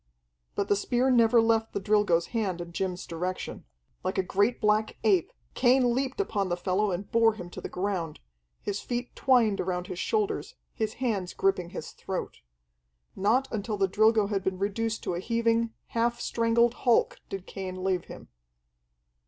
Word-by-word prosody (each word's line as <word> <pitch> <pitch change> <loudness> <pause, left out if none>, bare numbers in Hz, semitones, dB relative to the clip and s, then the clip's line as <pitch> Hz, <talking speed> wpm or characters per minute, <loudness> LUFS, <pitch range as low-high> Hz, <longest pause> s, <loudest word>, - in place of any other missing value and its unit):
But 200 - 0
the 205 - +3
spear 245 +5 +1
never 235 -1 +5
left 225 0 +2
the - - -1
Drilgo's 200 -4 +2
hand 200 -6 -1
in 170 0 -6
Jim's 180 0 -3
direction. 180 +3 -4 0.4
Like 185 +1 -2
a 190 - +2
great 200 +6 +1
black 215 0 +1
ape, 195 -6 +3 0.2
Cain 250 -1 +4
leaped 265 +4 -2
upon 205 - 0
the 175 - 0
fellow 190 +3 +1
and 190 +2 -4
bore 225 -1 +4
him 175 -4 -8
to - - -8
the - - -5
ground, 180 -5 -3 0.4
his 200 -1 -2
feet 245 0 -4
twined 235 -6 +3
around 180 -1 -2
his 185 -1 -6
shoulders, 430 -2 -1 0.2
his 220 -2 -2
hands 210 -8 -2
gripping 195 -3 +1
his - - -7
throat. - - -5 0.7
Not 230 +7 +2
until 210 0 -2
the 195 -1 +2
Drilgo 215 +2 +4
had 195 -2 0
been 190 -1 -1
reduced 220 +3 -2
to - - -2
a 170 - -2
heaving, 230 +2 +1 0.2
half 235 +1 0
strangled 230 +1 +2
hulk 240 -3 +3
did 195 -1 -5
Cain 185 -1 -6
leave 185 -2 0
him. - - -11
210 Hz, 170 wpm, -28 LUFS, 185-230 Hz, 0.7 s, never